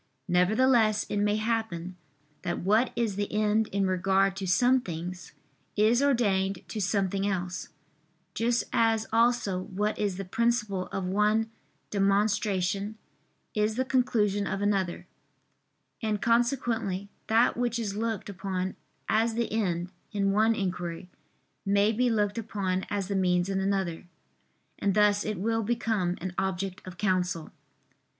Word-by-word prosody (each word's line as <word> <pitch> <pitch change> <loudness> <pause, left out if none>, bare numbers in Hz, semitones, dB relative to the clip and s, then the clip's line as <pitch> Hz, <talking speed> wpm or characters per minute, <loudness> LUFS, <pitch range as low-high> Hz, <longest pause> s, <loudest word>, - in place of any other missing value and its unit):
Nevertheless 215 +4 +3
it 205 - -1
may 205 0 +2
happen 215 -6 -2 0.5
that 175 - -2
what 215 +7 +2
is 225 -5 -1
the 205 0 -2
end 215 +1 +2
in 195 0 0
regard 190 +1 +2
to 195 -1 -3
some 245 +8 +4
things, 175 -2 -6 0.4
is 220 +4 +4
ordained 200 -9 +1
to 215 - -3
something 195 0 0
else; 180 -2 -3 0.6
just 235 +1 +1
as 225 -1 +2
also 230 -5 +2
what 210 +3 -2
is 200 -3 -1
the 195 - -4
principle 210 -2 0
of 195 - -4
one 210 +4 +1 0.4
demonstration, 200 0 +1 0.6
is 215 0 +1
the 260 +2 0
conclusion 215 -6 +1
of 195 - -2
another: 195 -3 0 1.0
and 215 -2 0
consequently 230 -5 0 0.2
that 225 +2 +4
which 240 -1 0
is 210 -4 -3
looked 225 -1 -2
upon 190 -1 -3 0.3
as 225 +1 +2
the 235 -2 -1
end 180 -5 -1 0.2
in 200 -2 +1
one 220 +3 +3
inquiry, 180 -3 -4 0.5
may 200 +2 +3
be 245 +3 +1
looked 210 -1 0
upon 195 -4 -2
as 200 -2 -2
the 200 - -2
means 180 -1 +2
in 195 -1 0
another; 190 -3 -1 0.7
and 200 -1 +1
thus 210 -1 +4
it 215 -1 -3
will 225 +4 0
become 220 -5 0
an 185 +1 -5
object 190 +1 -2
of 180 -1 -8
counsel. 180 -5 0
205 Hz, 140 wpm, -28 LUFS, 190-225 Hz, 1.0 s, some